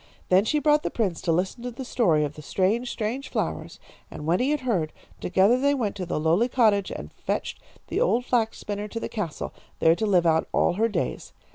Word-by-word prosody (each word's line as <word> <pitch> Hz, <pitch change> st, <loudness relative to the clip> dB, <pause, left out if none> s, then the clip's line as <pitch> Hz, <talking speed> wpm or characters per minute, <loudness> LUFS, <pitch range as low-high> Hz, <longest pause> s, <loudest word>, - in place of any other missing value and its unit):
Then 185 Hz, +3 st, +5 dB
she 300 Hz, -, +1 dB
brought 300 Hz, 0 st, +3 dB
the -, -, -2 dB
prince 195 Hz, -8 st, -1 dB
to 170 Hz, -, 0 dB
listen 185 Hz, +8 st, -1 dB
to 245 Hz, -, -4 dB
the 255 Hz, +2 st, -7 dB
story 170 Hz, -12 st, +2 dB
of 145 Hz, 0 st, -3 dB
the 150 Hz, -, -10 dB
strange, 205 Hz, -, 0 dB
strange 240 Hz, +6 st, -3 dB
flowers, -, -, -3 dB, 0.3 s
and 150 Hz, -, -8 dB
when 170 Hz, +3 st, +2 dB
he 260 Hz, -, +1 dB
had 300 Hz, -1 st, 0 dB
heard, 185 Hz, -12 st, 0 dB, 0.3 s
together 195 Hz, +7 st, +3 dB
they 285 Hz, +2 st, +3 dB
went 220 Hz, -7 st, -2 dB
to 180 Hz, -2 st, -4 dB
the -, -, -1 dB
lowly 170 Hz, +10 st, +2 dB
cottage 215 Hz, -6 st, +3 dB
and -, -, -7 dB
fetched -, -, -4 dB, 0.2 s
the -, -, -2 dB
old 250 Hz, -, +2 dB
flax 230 Hz, -4 st, +1 dB
spinner 205 Hz, 0 st, -4 dB
to 230 Hz, +2 st, -5 dB
the -, -, -4 dB
castle, 195 Hz, -9 st, -4 dB, 0.2 s
there 160 Hz, -, +5 dB
to 220 Hz, +4 st, -1 dB
live 180 Hz, -4 st, +3 dB
out 160 Hz, -1 st, +3 dB
all -, -, +3 dB
her 225 Hz, +5 st, +1 dB
days. 210 Hz, -, -3 dB
210 Hz, 225 wpm, -25 LUFS, 175-245 Hz, 0.3 s, Then